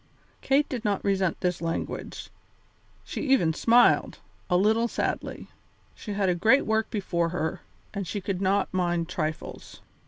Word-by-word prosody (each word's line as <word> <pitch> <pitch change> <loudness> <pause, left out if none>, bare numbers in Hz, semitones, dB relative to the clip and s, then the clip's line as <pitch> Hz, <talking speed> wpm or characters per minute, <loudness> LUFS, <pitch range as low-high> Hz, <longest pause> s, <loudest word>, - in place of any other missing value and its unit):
Kate 280 +2 +2
did 245 -4 -4
not 205 -3 0
resent 190 -3 +1
this 180 -2 -1
language; 165 0 -4 0.7
she - - -5
even 260 - +3
smiled, 235 +8 +4 0.3
a 180 - +4
little 220 +5 +3
sadly. - - -3 0.5
She 210 - -7
had 200 -1 0
a 180 - +3
great 220 +10 +4
work 220 0 +1
before 170 -5 -1
her, 160 -2 -3 0.3
and 200 -3 -4
she 205 - -3
could 190 -1 -3
not 195 +1 +1
mind 175 -2 0
trifles. 155 -3 -5
195 Hz, 150 wpm, -27 LUFS, 175-220 Hz, 0.7 s, smiled